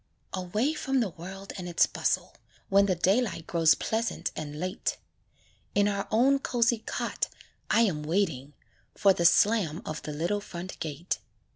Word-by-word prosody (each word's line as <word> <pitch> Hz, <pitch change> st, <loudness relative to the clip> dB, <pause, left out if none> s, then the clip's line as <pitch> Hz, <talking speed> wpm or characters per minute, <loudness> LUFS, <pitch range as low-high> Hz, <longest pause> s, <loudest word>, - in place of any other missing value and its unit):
Away 210 Hz, -, 0 dB
from 270 Hz, -3 st, 0 dB
the 220 Hz, -7 st, 0 dB
world 190 Hz, +4 st, -9 dB
and 180 Hz, -1 st, -5 dB
its 170 Hz, -, +4 dB
bustle, -, -, -1 dB, 0.4 s
When 200 Hz, +1 st, +5 dB
the 185 Hz, -, +2 dB
daylight 190 Hz, 0 st, +1 dB
grows 165 Hz, -2 st, +4 dB
pleasant 225 Hz, +1 st, -2 dB
and 150 Hz, -1 st, -5 dB
late; 185 Hz, +3 st, -2 dB, 0.8 s
In 205 Hz, 0 st, +4 dB
our 200 Hz, -1 st, -1 dB
own 265 Hz, +5 st, +4 dB
cosy 235 Hz, -3 st, +1 dB
cot, -, -, -2 dB, 0.4 s
I -, -, +4 dB
am 185 Hz, -10 st, +1 dB
waiting 150 Hz, -4 st, -1 dB, 0.4 s
For 195 Hz, -2 st, +5 dB
the 170 Hz, -, -1 dB
slam 185 Hz, -3 st, +4 dB
of 155 Hz, -, -4 dB
the 150 Hz, -, -6 dB
little 170 Hz, +7 st, -1 dB
front 180 Hz, -1 st, -8 dB
gate. 155 Hz, -3 st, -3 dB
190 Hz, 155 wpm, -28 LUFS, 165-215 Hz, 0.8 s, When